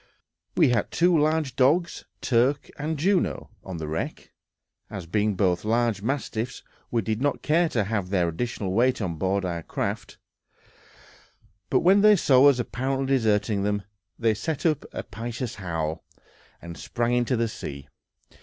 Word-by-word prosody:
We 160 -6 +5
had 120 - +3
left - - -21
two 175 +1 +3
large 155 -3 +1
dogs, 160 +7 +2 0.2
Turk 130 +3 +1
and 155 +2 -2
Juno, 185 +4 0
on 95 -2 -6
the 80 -1 -5
wreck, 80 +1 -4 0.6
as 95 -4 -6
being 105 +4 0
both 90 -2 +1
large 115 -2 +1
mastiffs 125 -1 -3 0.3
we 115 -2 0
did 110 +4 -2
not 145 0 0
care 165 +2 +3
to 115 -8 0
have 100 -2 -2
their 90 -3 +1
additional 95 +2 -3
weight 125 +5 +2
on 90 -6 -3
board 95 +3 0
our 85 -2 -3
craft; - - -4 1.5
but - - +3
when 195 +3 +5
they 210 0 +7
saw 135 -6 +5
us 140 - +2
apparently 130 +2 -2
deserting 105 -4 +1
them, 105 0 -1 0.3
they 115 -2 +2
set 155 +9 -4
up 155 -3 +1
a - - -5
piteous 120 +3 -5
howl, 80 -4 -3 0.6
and 85 -1 -9
sprang 120 0 -1
into 125 +1 +1
the 115 0 +1
sea. 70 -9 -7
115 Hz, 160 wpm, -25 LUFS, 100-140 Hz, 1.5 s, they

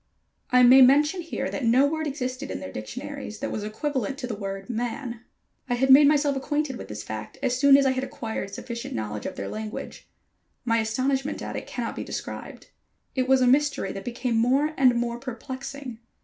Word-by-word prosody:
I 250 0 +5
may 255 +2 +9
mention 295 +7 +5
here 330 - -4
that 280 - -4
no 245 +4 +5
word 315 +2 -1
existed 270 -1 -4
in - - -4
their 95 - -7
dictionaries 210 - -6
that - - -4
was 215 - -3
equivalent 265 +3 -2
to 270 - -4
the 245 - -4
word 195 -1 -5
"man." 240 0 -4 0.5
I 245 - +2
had 265 +2 +3
made 285 +2 +9
myself 290 -1 +3
acquainted 290 0 -1
with - - -8
this 105 0 -6
fact 110 0 -7
as 245 - +1
soon 275 +1 +7
as 280 - +3
I 265 - +4
had 260 0 -2
acquired 220 -6 -5
sufficient 235 +3 -6
knowledge 105 -1 -4
of 185 - -6
their - - -5
language. 215 0 -7 0.6
My 230 -1 +2
astonishment 265 +6 -1
at - - -5
it - - -5
cannot - - -4
be - - -4
described. - - -7 0.4
It 255 -1 0
was 265 0 +4
a 250 - +4
mystery 280 -6 +2
that 195 - -7
became 245 0 -2
more 270 +7 +2
and 255 -4 +4
more 235 0 -1
perplexing. 260 0 -7
255 Hz, 200 wpm, -26 LUFS, 225-275 Hz, 0.6 s, may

